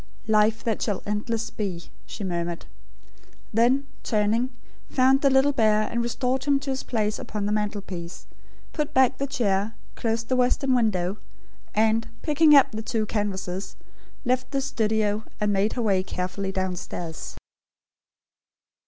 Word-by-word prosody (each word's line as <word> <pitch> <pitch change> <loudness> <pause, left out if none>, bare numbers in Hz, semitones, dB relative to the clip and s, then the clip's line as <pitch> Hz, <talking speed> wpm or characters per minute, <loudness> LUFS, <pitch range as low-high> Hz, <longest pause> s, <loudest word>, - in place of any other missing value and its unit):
"Life, 215 0 +3
that 225 -2 -1
shall 205 -4 -1
endless 220 +2 -2
be," 185 -5 -4 0.2
she 210 - -6
murmured. 170 -2 -3 0.9
Then, 245 +5 +3 0.2
turning, 220 +3 +1 0.4
found 265 +1 +4
the 275 - +5
little 270 +2 +4
bear, 215 -4 +3
and 235 +2 -1
restored 255 +2 -1
him 280 -1 +3
to 275 -1 -3
his 265 - -2
place 215 -3 -1
upon 210 -1 -4
the 205 - 0
mantelpiece; 200 -5 -3 0.5
put 300 -2 -2
back 260 0 +4
the 275 - -1
chair; 215 -5 0 0.2
closed 225 0 -2
the 255 - +1
western 255 +1 +2
window; 205 -5 +1 0.6
and, 220 +1 +2 0.2
picking 300 0 +5
up 275 - +6
the 220 -1 -4
two 220 -1 -1
canvases, 195 -3 -3 0.5
left 255 +1 +1
the 275 -1 -1
studio, 220 -5 0 0.2
and 210 -1 +1
made 200 +2 +1
her 240 - -1
way 195 -4 +3
carefully 185 +1 -3
downstairs. 180 -3 -4
220 Hz, 145 wpm, -25 LUFS, 200-255 Hz, 0.9 s, up